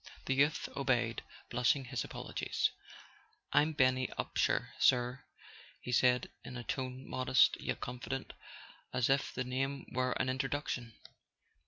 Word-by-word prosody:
The 135 - +1
youth 145 +3 +2
obeyed, 120 -4 +1 0.3
blushing 125 +3 +2
his - - -2
apologies. - - -2 0.8
"I'm 155 +2 +4
Benny 130 -2 +3
Upsher, - - +1
sir," 125 +1 +3 0.6
he 125 - -6
said, 125 +1 +3
in 125 - -7
a 120 - -5
tone 130 +2 -4
modest 130 0 +3
yet - - -3
confident, 130 +2 -4 0.6
as 125 +1 +2
if 140 +1 +2
the 130 - -2
name 135 +2 -2
were 125 0 +1
an 130 - -1
introduction. 130 -3 -2
130 Hz, 130 wpm, -34 LUFS, 125-135 Hz, 0.8 s, I'm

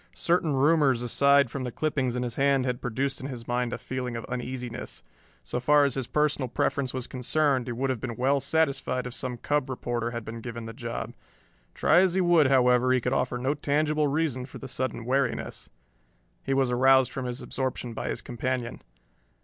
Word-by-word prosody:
Certain 170 -3 +1
rumors 135 -3 +3
aside 140 +1 +4
from 140 - -4
the 125 - -3
clippings 135 -3 -1
in 125 - -1
his 120 -2 -3
hand 135 0 +2
had 125 -1 -2
produced 130 +3 -2
in 135 - -4
his 120 -4 -8
mind 120 0 -1
a - - -3
feeling 125 -2 -4
of 115 - -5
uneasiness. 125 -1 -5 0.4
So - - -3
far 145 +3 +4
as 140 - 0
his 130 -2 -3
personal 150 -3 +1
preference 135 +2 -1
was 130 -2 -4
concerned 130 0 0
he - - -2
would 130 +3 -1
have 120 -4 -4
been 120 -3 -4
well 135 +4 +2
satisfied 135 -4 0
if 125 - -6
some 125 -1 -4
cub 145 +1 -1
reporter 120 -2 -2
had 115 -2 -6
been 115 +1 -7
given 115 -1 -6
the 115 - -7
job. 120 -1 -5 0.6
Try 165 - +4
as 185 -1 +3
he 190 - +3
would, 170 -5 +5
however, 125 -1 +4
he 130 - +4
could 125 +2 -1
offer 125 -2 0
no 130 +3 0
tangible 150 +1 +1
reason 140 -4 -1
for - - -10
the 135 - -8
sudden 130 -2 -3
wariness. 130 0 -1 0.7
He 135 - 0
was 135 -2 +2
aroused 130 +1 +4
from 130 - -4
his 125 +1 -4
absorption 130 -2 -3
by - - -4
his - - -4
companion. 125 0 -3
130 Hz, 200 wpm, -27 LUFS, 125-140 Hz, 0.7 s, would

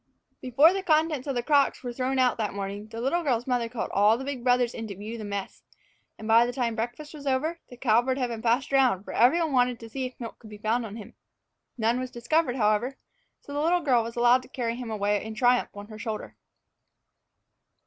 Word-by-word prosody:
Before 280 +7 +5
the 390 - -2
contents 310 -5 +1
of 275 - -2
the 240 - -1
crocks 285 -1 +2
were 245 -1 -4
thrown 260 +2 -1
out 255 -2 +3
that 215 -3 -2
morning, 200 +1 -5
the 225 +1 -8
little 275 +9 0
girl's 245 -7 0
mother 245 -3 0
called 240 -1 -4
all 205 +2 +5
of - - 0
the 265 - -6
big 270 -4 -5
brothers 245 -1 +2
in 225 -1 -6
to 200 - -7
view 210 +4 -7
the 225 - -7
mess; 200 -1 -5 0.6
and 215 - -8
by 230 +1 +6
the 240 - -1
time 245 -2 -1
breakfast 240 +7 -5
was 290 -2 -9
over, 305 +6 0
the 245 - -12
cowbird 245 +2 +2
had 250 -2 -1
been 230 -2 -5
passed 240 +4 +1
around, 255 -8 +3
for - - -8
every 255 +9 +4
one 320 -4 -1
wanted 250 -2 +2
to 230 - -10
see 265 +1 -3
if 255 - -12
any 240 - -8
milk 230 - -10
could 220 - -13
be 210 - -10
found 225 +3 -1
on 205 - -9
him. 220 -3 -10 0.6
None 230 +2 +1
was 255 0 -4
discovered, 245 +3 0
however, 230 +3 +1 0.4
so 285 - -10
the 290 - -1
little 345 +3 +2
girl 255 -6 +3
was 230 +1 -6
allowed 240 +1 +4
to 255 - -15
carry 235 -3 -3
him 245 -1 -6
away 205 -1 0
in 220 0 -7
triumph 245 +2 +3
on 205 0 -8
her 215 -1 -10
shoulder. 215 0 -5
245 Hz, 240 wpm, -27 LUFS, 225-265 Hz, 0.6 s, by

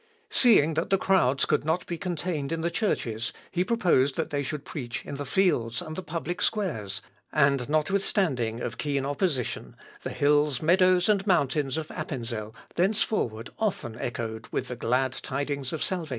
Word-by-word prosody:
Seeing 210 - +5
that 160 +2 -1
the 195 - +4
crowds 140 -9 +3
could 150 - +1
not 160 +4 0
be 170 - -3
contained 170 -4 -3
in 165 0 -1
the 170 +1 0
churches, 120 - -1 0.2
he 180 - +1
proposed 170 - +2
that - - -2
they 145 -1 0
should 145 +1 -4
preach 125 -6 -5
in - - -6
the 145 -1 -5
fields 125 -11 +2
and 155 -3 -6
the 185 - -3
public 170 +1 -4
squares, 110 - -1 0.3
and, 140 -3 +3
notwithstanding 155 - +1
of 120 +2 -4
keen 140 -2 0
opposition, 140 - -1 0.3
the - - -4
hills, 145 -2 +2
meadows, 180 +2 +4
and 205 -1 +2
mountains 145 -5 +2
of 155 -1 -4
Appenzel, 115 -7 -5 0.2
thenceforward 175 - 0
often 190 - -1
echoed 115 -2 -4
with 130 - -3
the 125 - -3
glad 125 +2 +1
tidings 140 -1 -3
of 160 - -2
salvation. 175 -5 -2
150 Hz, 165 wpm, -27 LUFS, 130-180 Hz, 0.3 s, Seeing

